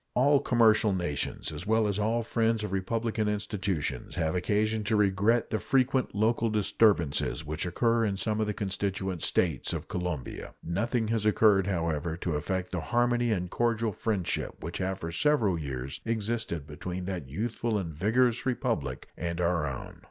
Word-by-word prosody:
All 140 Hz, +3 st, +5 dB
commercial 110 Hz, -5 st, +4 dB
nations, 85 Hz, -6 st, -2 dB
as 80 Hz, +6 st, -7 dB
well 110 Hz, 0 st, +3 dB
as 100 Hz, 0 st, -1 dB
all 115 Hz, +3 st, +1 dB
friends 115 Hz, -1 st, +1 dB
of 105 Hz, -, -3 dB
republican 110 Hz, +3 st, -1 dB
institutions, 95 Hz, -, -2 dB
have 80 Hz, -2 st, 0 dB
occasion 105 Hz, +4 st, +1 dB
to 110 Hz, -, +1 dB
regret 105 Hz, +3 st, +2 dB
the 110 Hz, -, 0 dB
frequent 130 Hz, -2 st, +1 dB
local 115 Hz, +2 st, +2 dB
disturbances 100 Hz, -8 st, +2 dB
which 75 Hz, +4 st, -3 dB
occur 115 Hz, +6 st, +2 dB
in 100 Hz, -3 st, 0 dB
some 110 Hz, +1 st, 0 dB
of 110 Hz, -, 0 dB
the 105 Hz, -, -1 dB
constituent 95 Hz, -2 st, -2 dB
States 80 Hz, -7 st, +1 dB
of -, -, -4 dB
Colombia. 90 Hz, -7 st, -4 dB
Nothing 110 Hz, +6 st, -1 dB
has 115 Hz, -2 st, 0 dB
occurred, 105 Hz, -3 st, +4 dB
however, 85 Hz, -3 st, -1 dB
to 85 Hz, -1 st, -2 dB
affect 90 Hz, +5 st, -2 dB
the 90 Hz, -, -2 dB
harmony 120 Hz, +3 st, +1 dB
and 90 Hz, -4 st, -1 dB
cordial 115 Hz, -2 st, +1 dB
friendship 100 Hz, -2 st, -2 dB
which 85 Hz, -, -4 dB
have 95 Hz, 0 st, -1 dB
for 85 Hz, -, -5 dB
several 115 Hz, -, +2 dB
years 70 Hz, -3 st, -5 dB
existed 110 Hz, -7 st, -2 dB
between 90 Hz, +5 st, -5 dB
that 90 Hz, -8 st, -4 dB
youthful 110 Hz, -, -1 dB
and 85 Hz, -5 st, -3 dB
vigorous 115 Hz, -, +2 dB
Republic 115 Hz, -, -2 dB
and 85 Hz, 0 st, -3 dB
our 85 Hz, -4 st, +1 dB
own. 70 Hz, -3 st, -6 dB
100 Hz, 165 wpm, -29 LUFS, 85-115 Hz, -, All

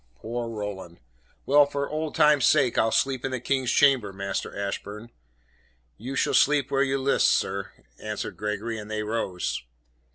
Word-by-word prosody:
"Poor 115 Hz, +1 st, -5 dB
Roland! 100 Hz, -6 st, -6 dB, 0.5 s
Well, 145 Hz, +1 st, +5 dB
for 140 Hz, 0 st, -3 dB
old 155 Hz, 0 st, -4 dB
time's 150 Hz, -5 st, +4 dB
sake, 135 Hz, -4 st, +3 dB
I'll 110 Hz, 0 st, +2 dB
sleep 130 Hz, 0 st, 0 dB
in 135 Hz, -, -1 dB
the 130 Hz, -1 st, -3 dB
King's 130 Hz, 0 st, -1 dB
chamber, 130 Hz, -8 st, +3 dB
Master 100 Hz, +1 st, -4 dB
Ashburn." 105 Hz, +3 st, -5 dB, 0.9 s
"You 130 Hz, +5 st, -6 dB
shall -, -, +1 dB
sleep 145 Hz, -1 st, +3 dB
where 135 Hz, 0 st, +2 dB
you 135 Hz, 0 st, +1 dB
list, 135 Hz, +1 st, +2 dB
sir," 100 Hz, 0 st, 0 dB, 0.3 s
answered 105 Hz, -1 st, -5 dB
Gregory, 105 Hz, +2 st, -3 dB
and 105 Hz, 0 st, -9 dB
they 110 Hz, 0 st, -2 dB
rose. 105 Hz, -5 st, -2 dB
120 Hz, 160 wpm, -26 LUFS, 105-135 Hz, 0.9 s, Well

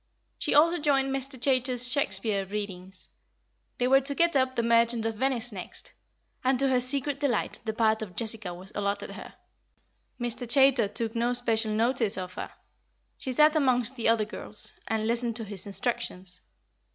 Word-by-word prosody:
She -, -, -1 dB
also 335 Hz, +4 st, +4 dB
joined 270 Hz, -2 st, +1 dB
Mr. 270 Hz, -1 st, -2 dB
Chaytor's 250 Hz, -1 st, +4 dB
Shakespeare 205 Hz, -6 st, 0 dB
readings; 190 Hz, -2 st, -6 dB, 0.7 s
they 250 Hz, -, 0 dB
were 270 Hz, +1 st, +5 dB
to 280 Hz, +1 st, -2 dB
get 340 Hz, 0 st, +2 dB
up 260 Hz, -1 st, +1 dB
The 235 Hz, -, 0 dB
Merchant 230 Hz, 0 st, +2 dB
of 225 Hz, -, -1 dB
Venice 245 Hz, -2 st, 0 dB
next, 185 Hz, -4 st, -7 dB, 0.5 s
and 260 Hz, 0 st, +2 dB
to 270 Hz, +1 st, +1 dB
her 255 Hz, -1 st, +2 dB
secret 275 Hz, +2 st, +1 dB
delight 265 Hz, -7 st, -1 dB
the 220 Hz, -, -2 dB
part 220 Hz, -1 st, +1 dB
of 190 Hz, -5 st, -7 dB
Jessica 220 Hz, -2 st, 0 dB
was 185 Hz, +3 st, -9 dB
allotted 200 Hz, 0 st, -3 dB
her. -, -, -11 dB, 0.8 s
Mr. 240 Hz, 0 st, -1 dB
Chaytor 270 Hz, -5 st, +6 dB
took 225 Hz, +1 st, -1 dB
no 240 Hz, +1 st, 0 dB
special 230 Hz, -2 st, 0 dB
notice 225 Hz, -1 st, +1 dB
of 185 Hz, -1 st, -6 dB
her; -, -, -6 dB, 0.7 s
she 260 Hz, -, -3 dB
sat 300 Hz, +4 st, +4 dB
amongst 255 Hz, -4 st, +2 dB
the 230 Hz, -3 st, 0 dB
other 225 Hz, -2 st, +2 dB
girls, 210 Hz, 0 st, -5 dB, 0.2 s
and 220 Hz, -1 st, -1 dB
listened 235 Hz, 0 st, -1 dB
to 230 Hz, -, -5 dB
his 205 Hz, -2 st, -5 dB
instructions. 195 Hz, -4 st, -2 dB
235 Hz, 170 wpm, -27 LUFS, 215-260 Hz, 0.8 s, Chaytor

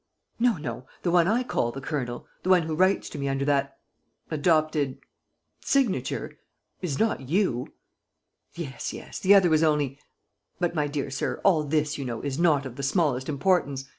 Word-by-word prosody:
"No, 235 Hz, -4 st, +3 dB
no.... 125 Hz, -4 st, -6 dB, 0.2 s
The 175 Hz, -, +1 dB
one 175 Hz, -1 st, +4 dB
I 230 Hz, +5 st, +2 dB
call 120 Hz, -, -1 dB
the 135 Hz, -, -7 dB
Colonel, 130 Hz, -4 st, -4 dB, 0.2 s
the 185 Hz, -, -3 dB
one 180 Hz, -2 st, +5 dB
who 160 Hz, 0 st, -3 dB
writes 185 Hz, +4 st, +2 dB
to 145 Hz, -, -7 dB
me 140 Hz, 0 st, -1 dB
under 135 Hz, 0 st, -1 dB
that... 140 Hz, -1 st, 0 dB, 0.5 s
adopted... 155 Hz, -3 st, +1 dB, 0.6 s
signature... 235 Hz, -, -1 dB, 0.4 s
is 155 Hz, -7 st, -2 dB
not 175 Hz, -, 0 dB
you!" 165 Hz, -, 0 dB, 0.8 s
"Yes, 140 Hz, -8 st, -5 dB
yes... -, -, -8 dB
the 200 Hz, +2 st, +6 dB
other 185 Hz, -4 st, +5 dB
was 155 Hz, 0 st, +4 dB
only... 145 Hz, -3 st, +1 dB, 0.6 s
But, 175 Hz, -1 st, 0 dB
my 150 Hz, -3 st, 0 dB
dear 140 Hz, -1 st, -3 dB
sir, 135 Hz, -, -2 dB
all 165 Hz, -6 st, +4 dB
this, 150 Hz, 0 st, 0 dB
you -, -, -3 dB
know, 120 Hz, -3 st, -4 dB
is 140 Hz, +1 st, -3 dB
not 155 Hz, -5 st, +3 dB
of 130 Hz, -1 st, -8 dB
the -, -, -4 dB
smallest 140 Hz, -3 st, +1 dB
importance. 140 Hz, -3 st, +1 dB
150 Hz, 175 wpm, -26 LUFS, 135-175 Hz, 0.8 s, the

